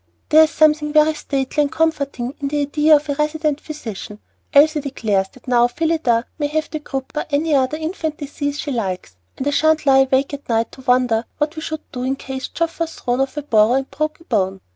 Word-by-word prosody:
"There 310 +1 +7
is - - -5
something 305 -1 +3
very 305 0 +5
stately 275 -1 -1
and 285 -2 0
comforting 280 -6 -1
in 280 - -2
the 290 +1 -1
idea 300 +2 +4
of 295 +1 0
a 285 - 0
'resident 300 0 -1
physician.' 220 -9 -7 0.3
Elsie 300 +1 +5
declares 215 -8 -1
that 260 - -19
now 240 -1 +4
Phillida 265 -4 0
may 290 - +1
have 310 +1 -2
croup 270 0 -5
or 300 - -1
any 305 +2 +1
other 270 +2 +2
infant 315 -1 -3
disease 285 0 -4
she 295 - -3
likes, 190 - -3 0.2
and 265 - -4
I - - +2
sha'n't 315 +1 +2
lie 270 -1 +6
awake 270 +2 +2
at 285 -2 -8
night 225 0 +1
to 265 - -13
wonder 250 -3 +2
what 300 +2 -1
we 315 - -5
should 315 -1 -4
do 250 - -5
in 260 +2 0
case 265 -1 -6
Geoffey 335 0 -3
was 330 -1 -2
thrown 245 +2 0
from 295 +2 -7
the - - -30
burro 220 0 +4
and 270 +1 -1
broke 310 +1 -2
a - - -17
bone. 195 - -1
285 Hz, 220 wpm, -20 LUFS, 255-310 Hz, 0.3 s, There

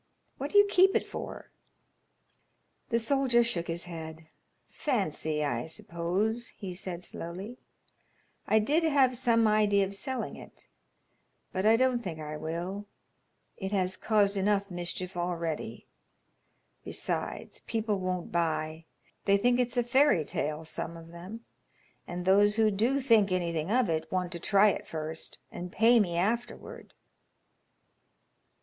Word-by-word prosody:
"What 280 +2 -3
do 410 - +2
you 410 - +9
keep 385 -1 +4
it - - +1
for?" - - -7 1.4
The 230 - +2
soldier 240 0 +3
shook 180 -8 -2
his 170 0 -3
head. 160 -2 -8 0.4
"Fancy, 160 - -1
I 125 -3 -1
suppose," 185 +9 -2
he 190 -4 -6
said, 180 -1 -6
slowly. 190 +11 -7 0.9
"I 220 - +4
did 290 +10 +3
have 280 -6 +3
some 230 -2 +3
idea 210 -2 +3
of 195 - -6
selling 255 +6 -4
it, - - -12 0.9
but 190 +2 +1
I 225 +1 +6
don't 255 -1 +2
think 175 -8 -6
I 155 0 -5
will. 170 +6 -4 0.7
It 190 -1 -4
has 185 -1 +1
caused 205 -2 +2
enough 200 0 +1
mischief 175 +1 -5
already. 170 -3 -3 1.0
Besides, - - -4
people 220 -3 -1
won't 185 -1 -3
buy. 160 -1 -1 0.4
They 200 0 +5
think 245 +4 +2
it's 245 0 0
a 245 - +3
fairy 240 - +4
tale; 150 +2 -3
some 165 +1 -5
of 165 0 -12
them, 180 +7 -9 0.7
and 175 0 -5
those 205 +2 +5
who 220 -1 +4
do 235 +8 +1
think 225 -7 +4
anything 170 -2 -1
of 245 +1 +3
it 160 -2 -2
want 180 -2 -1
to 170 - -2
try 200 +4 +5
it - - -3
first 160 0 -5
and 175 0 -6
pay 230 +4 +5
me 175 -5 +1
afterward." 230 +7 -3
195 Hz, 140 wpm, -29 LUFS, 170-230 Hz, 1.4 s, you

